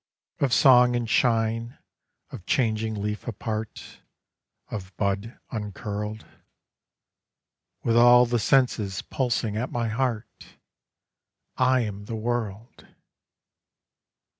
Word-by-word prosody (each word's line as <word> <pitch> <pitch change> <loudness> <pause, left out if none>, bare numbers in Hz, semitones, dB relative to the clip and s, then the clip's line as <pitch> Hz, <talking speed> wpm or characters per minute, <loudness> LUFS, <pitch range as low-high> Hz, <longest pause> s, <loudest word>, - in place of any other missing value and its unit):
Of 140 -3 +1
song 125 -1 +6
and 120 -1 -1
shine, 115 0 +1 0.5
of 95 - -10
changing 110 -3 0
leaf 105 +3 -4
apart, 110 -1 -6 0.7
Of 95 -2 -7
bud 100 +3 -2
uncurled: 105 0 -5 1.6
With 115 - +1
all 120 +1 +7
the 120 0 0
senses 110 -5 +1
pulsing 120 -5 -1
at 125 +4 -3
my 115 -1 -1
heart, 115 -2 -4 1.0
I 130 0 +3
am 105 -2 -5
the 115 - -5
world. 110 -1 -4
115 Hz, 95 wpm, -25 LUFS, 105-120 Hz, 1.6 s, all